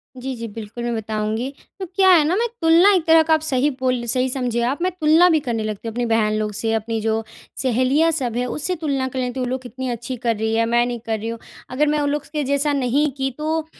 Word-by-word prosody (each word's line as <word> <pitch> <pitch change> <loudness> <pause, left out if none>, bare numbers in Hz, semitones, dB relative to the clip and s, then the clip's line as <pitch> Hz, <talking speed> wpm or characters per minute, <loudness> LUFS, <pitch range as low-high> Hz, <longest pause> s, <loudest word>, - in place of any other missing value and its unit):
जी, 255 0 -5
जी 230 0 -6
बिल्कुल 225 +2 -8
मैं 240 0 -1
बताऊँगी। 220 +3 -2 0.3
तो 380 - -3
क्या 380 +2 +2
है 325 -4 +6
न 350 +6 +1
मैं 475 - +1
तुलना 335 +5 +6
एक 355 -4 +1
तरह 325 0 +7
का 320 - +2
आप 315 - +4
सही 285 -2 +1
बोल 255 -2 0
सही 255 +2 +1
समझे 245 -2 -1
आप 270 +7 -1
मैं 370 +1 +1
तुलना 315 +3 +6
भी 315 - +3
करने 235 -6 -3
लगती 215 +1 -5
हूँ 225 - -4
अपनी 245 0 -1
बहन 225 -2 +1
लोग 215 0 -1
से 225 +2 -1
अपनी 225 0 -2
जो 220 0 0 0.4
सहेलियाँ 260 +5 +2
सब 250 -7 -2
हैं 250 - 0
उससे 305 +8 -2
तुलना 280 -5 -1
कर 260 0 -5
लेती 250 0 -3
हूँ। 255 - -1
वो 245 - -3
लोग 260 0 -2
कितनी 255 +1 -6
अच्छी 240 +2 -4
कर 230 -1 0
रही 220 +1 -1
है 230 - +2
मैं 240 +1 +2
नहीं 240 -1 -4
कर 220 -1 -2
रही 225 +2 -4
हूँ 230 - -5 0.3
अगर 290 +4 +1
मैं 300 0 +1
उन 285 - 0
लोग 295 0 -2
के 300 -1 -1
जैसा 280 +2 +1
नहीं 275 +3 +1
की 270 0 0
तो 315 +1 -1
255 Hz, 265 wpm, -21 LUFS, 230-300 Hz, 0.4 s, तरह